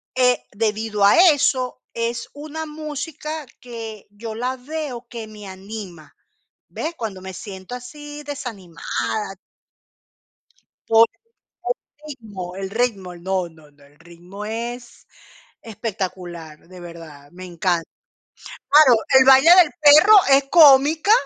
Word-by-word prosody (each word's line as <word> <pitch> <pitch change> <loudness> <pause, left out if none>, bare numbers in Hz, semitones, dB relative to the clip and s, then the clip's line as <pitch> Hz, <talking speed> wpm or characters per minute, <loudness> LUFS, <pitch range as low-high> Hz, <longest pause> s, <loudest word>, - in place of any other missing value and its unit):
eh, 250 -1 +2
debido 215 -1 -1
a 205 - +5
eso, 255 -3 -1
es 230 0 -3
una 310 +2 -7
música 305 0 -6
que 225 -4 -9
yo 220 +2 -8
la 250 +3 -3
veo 275 -2 -6
que 230 -3 -8
me 210 -1 -12
anima, 190 -4 -10 0.5
¿ves? 330 +2 -5
Cuando 210 -5 -6
me 190 0 -8
siento 190 +3 -9
así, 295 +4 -9
desanimada 195 - -5 1.5
Por 225 0 +6 0.4
el 245 0 -5 0.4
ritmo, 190 -6 -9
el 195 0 -5
ritmo. 200 -6 -2
No, 185 0 -3
no, 160 -2 -20
no, 145 0 -24
el 145 +2 -25
ritmo 175 +5 -11
es 235 +3 -7 0.6
espectacular, 180 -8 -7
de 185 0 -13
verdad, 165 -4 -12
me 185 +1 -10
encanta. 175 -1 -2 0.8
Claro, 270 -7 +6 0.2
el 260 - +6
baile 270 +4 +7
del 350 -5 +6
perro 310 +9 +8
es 275 +1 +6
cómica 305 +3 +6
225 Hz, 120 wpm, -21 LUFS, 185-265 Hz, 1.5 s, perro